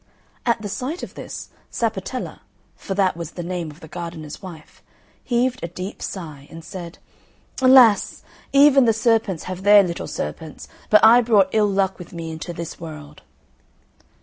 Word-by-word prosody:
At 235 Hz, -1 st, +2 dB
the -, -, -3 dB
sight 255 Hz, -, -4 dB
of -, -, -7 dB
this, -, -, -8 dB, 0.2 s
Sapatella 225 Hz, +2 st, -3 dB, 0.4 s
(for 195 Hz, -, -6 dB
that 190 Hz, -3 st, +2 dB
was 170 Hz, -1 st, -7 dB
the 175 Hz, -, -6 dB
name 175 Hz, -2 st, -4 dB
of 150 Hz, +2 st, -14 dB
the 160 Hz, -, -11 dB
gardener's 165 Hz, -2 st, -7 dB
wife) 170 Hz, -5 st, -12 dB, 0.4 s
heaved 250 Hz, +1 st, 0 dB
a -, -, -2 dB
deep 180 Hz, +3 st, -7 dB
sigh, 155 Hz, -7 st, -7 dB
and 165 Hz, 0 st, -11 dB
said, 175 Hz, -4 st, -8 dB, 0.6 s
"Alas! 255 Hz, -6 st, +5 dB, 0.3 s
even 280 Hz, -1 st, +6 dB
the 225 Hz, -, +4 dB
serpents 220 Hz, -5 st, +1 dB
have 185 Hz, 0 st, -6 dB
their 205 Hz, +1 st, +7 dB
little 170 Hz, -2 st, -4 dB
serpents; 150 Hz, -, -6 dB, 0.2 s
but 215 Hz, +1 st, +6 dB
I 235 Hz, +2 st, +8 dB
brought 210 Hz, -5 st, +3 dB
ill 210 Hz, -1 st, +3 dB
luck 195 Hz, -1 st, 0 dB
with 180 Hz, -, -11 dB
me 165 Hz, -1 st, -6 dB
into 160 Hz, +2 st, -6 dB
this 170 Hz, -1 st, -7 dB
world." 150 Hz, -3 st, -10 dB
190 Hz, 165 wpm, -22 LUFS, 165-225 Hz, 0.6 s, I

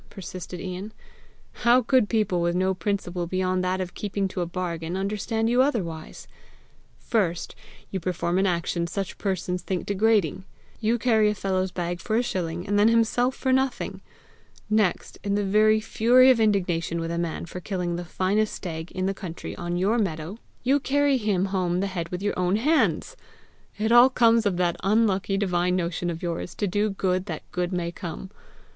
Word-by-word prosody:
persisted 180 Hz, -2 st, -8 dB
Ian. 190 Hz, +4 st, -6 dB, 0.7 s
"How 245 Hz, +2 st, +5 dB
could 250 Hz, -2 st, +3 dB
people 210 Hz, -6 st, +1 dB
with 170 Hz, 0 st, +1 dB
no 185 Hz, +1 st, +2 dB
principle 180 Hz, -2 st, -2 dB
beyond 185 Hz, 0 st, 0 dB
that 185 Hz, +1 st, 0 dB
of 185 Hz, -1 st, -4 dB
keeping 200 Hz, -1 st, -2 dB
to 185 Hz, -, -4 dB
a 175 Hz, -, -1 dB
bargain, 175 Hz, -1 st, -3 dB
understand 210 Hz, +3 st, -1 dB
you 245 Hz, +2 st, +4 dB
otherwise! 180 Hz, -, -2 dB, 0.7 s
First, 180 Hz, -7 st, -1 dB, 0.4 s
you 190 Hz, -, -2 dB
perform 180 Hz, 0 st, -1 dB
an 195 Hz, -, +3 dB
action 170 Hz, -1 st, -1 dB
such 195 Hz, +2 st, -4 dB
persons 185 Hz, -2 st, -2 dB
think 185 Hz, -2 st, -3 dB
degrading: 200 Hz, -4 st, +1 dB, 0.4 s
you 230 Hz, +2 st, +1 dB
carry 220 Hz, -2 st, +3 dB
a 210 Hz, -, -1 dB
fellow's 190 Hz, -1 st, -1 dB
bag 175 Hz, -1 st, -3 dB
for 215 Hz, -, -2 dB
a 240 Hz, -, +3 dB
shilling, 175 Hz, -5 st, -3 dB
and 205 Hz, +1 st, +2 dB
then 210 Hz, -, +6 dB
himself 230 Hz, +3 st, +2 dB
for 260 Hz, -1 st, 0 dB
nothing! 265 Hz, -1 st, -1 dB, 0.7 s
Next, 215 Hz, -4 st, +1 dB
in 200 Hz, 0 st, 0 dB
the 205 Hz, -, +1 dB
very 215 Hz, +2 st, +4 dB
fury 245 Hz, +4 st, +5 dB
of 245 Hz, -, +2 dB
indignation 180 Hz, -6 st, +1 dB
with 165 Hz, 0 st, -3 dB
a 170 Hz, -, -2 dB
man 170 Hz, -1 st, -3 dB
for 175 Hz, +1 st, -7 dB
killing 180 Hz, -2 st, -3 dB
the 175 Hz, -, -4 dB
finest 195 Hz, +5 st, 0 dB
stag 160 Hz, -2 st, -6 dB
in 185 Hz, 0 st, -2 dB
the 195 Hz, -, 0 dB
country 185 Hz, -4 st, -7 dB
on 175 Hz, 0 st, -3 dB
your 205 Hz, +6 st, +2 dB
meadow, 175 Hz, +1 st, -3 dB, 0.2 s
you 270 Hz, +4 st, +3 dB
carry 285 Hz, 0 st, +2 dB
him 205 Hz, -5 st, +1 dB
home 185 Hz, -2 st, 0 dB
the 195 Hz, -, 0 dB
head 175 Hz, -4 st, -4 dB
with 180 Hz, +2 st, -5 dB
your 205 Hz, -, 0 dB
own 180 Hz, +1 st, +1 dB
hands! 250 Hz, -, +1 dB, 0.6 s
It 220 Hz, +2 st, 0 dB
all 240 Hz, +2 st, +8 dB
comes 230 Hz, -3 st, +4 dB
of 185 Hz, -3 st, 0 dB
that 175 Hz, -1 st, +1 dB
unlucky 195 Hz, -1 st, +2 dB
divine 180 Hz, -2 st, +1 dB
motion 175 Hz, 0 st, -1 dB
of 165 Hz, 0 st, -5 dB
yours 170 Hz, 0 st, -4 dB
to 205 Hz, -, -1 dB
do 205 Hz, +3 st, +1 dB
good 185 Hz, -1 st, -1 dB
that -, -, -5 dB
good 180 Hz, 0 st, -2 dB
may 175 Hz, -2 st, -2 dB
come! 180 Hz, +1 st, -7 dB
190 Hz, 185 wpm, -25 LUFS, 175-215 Hz, 0.7 s, all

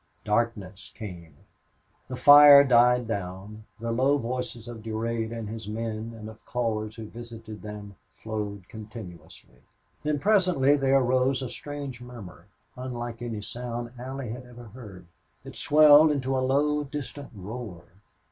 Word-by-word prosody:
Darkness 105 Hz, -3 st, -2 dB
came; 85 Hz, -8 st, -9 dB, 0.7 s
the 130 Hz, -, -5 dB
fire 145 Hz, +2 st, +9 dB
died 125 Hz, -2 st, +4 dB
down; 100 Hz, +1 st, -6 dB
the 115 Hz, +1 st, -3 dB
low 135 Hz, +5 st, +2 dB
voices 125 Hz, -2 st, -5 dB
of 120 Hz, -2 st, -8 dB
Durade 115 Hz, +1 st, -3 dB
and 115 Hz, -2 st, -5 dB
his 110 Hz, -1 st, -7 dB
men, 110 Hz, +1 st, -4 dB
and 110 Hz, -1 st, -9 dB
of 110 Hz, 0 st, -12 dB
callers 110 Hz, -3 st, -2 dB
who 115 Hz, -, -8 dB
visited 115 Hz, -1 st, -10 dB
them, 105 Hz, -1 st, -9 dB, 0.2 s
flowed 105 Hz, -4 st, -5 dB
continuously. 90 Hz, -, -12 dB, 0.4 s
Then, 150 Hz, 0 st, -1 dB
presently, 180 Hz, -7 st, +3 dB
there 135 Hz, -1 st, +3 dB
arose 130 Hz, +1 st, +1 dB
a 125 Hz, -, -4 dB
strange 140 Hz, -4 st, -7 dB
murmur, 110 Hz, -8 st, -11 dB, 0.3 s
unlike 120 Hz, -2 st, -6 dB
any 115 Hz, -3 st, -4 dB
sound 120 Hz, 0 st, -5 dB
Allie 130 Hz, -1 st, -6 dB
had 125 Hz, +2 st, -7 dB
ever 120 Hz, -2 st, -13 dB
heard. 100 Hz, -6 st, -12 dB, 0.4 s
It -, -, -10 dB
swelled 150 Hz, +1 st, +6 dB
into 135 Hz, -2 st, -1 dB
a 130 Hz, -, +1 dB
low, 145 Hz, +3 st, +1 dB
distant 145 Hz, 0 st, -7 dB
roar. 100 Hz, -2 st, -8 dB
120 Hz, 140 wpm, -26 LUFS, 110-130 Hz, 0.7 s, fire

